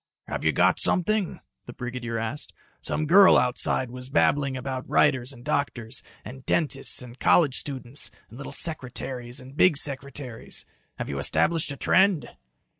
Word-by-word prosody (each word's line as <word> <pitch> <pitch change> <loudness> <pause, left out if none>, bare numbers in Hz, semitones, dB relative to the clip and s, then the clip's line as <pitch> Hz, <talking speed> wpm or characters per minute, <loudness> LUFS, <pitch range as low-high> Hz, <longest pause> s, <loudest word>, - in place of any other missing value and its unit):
"Have - - -4
you - - +3
got - - +3
something?" 200 +1 +1 0.3
the 120 - -8
brigadier 120 -2 -5
asked. 115 +6 -5 0.3
"Some 155 - -2
girl 190 +5 +7
outside 125 0 +2
was 125 +1 -8
babbling 140 -1 +2
about 130 0 -5
writers 130 -3 +2
and 120 -2 -14
doctors, 120 -4 -2 0.2
and 130 +1 -10
dentists 140 -3 0
and 125 +1 -12
college 150 -7 +4
students, 135 -1 -2 0.2
and 120 - -13
little 140 - -7
secretaries 125 -4 -2
and 130 +1 -13
big 160 -2 +5
secretaries. 140 -4 -3 0.3
Have - - -4
you 70 -1 -4
established 160 - 0
a 140 - -7
trend?" 190 +3 +3
130 Hz, 150 wpm, -25 LUFS, 125-150 Hz, 0.3 s, girl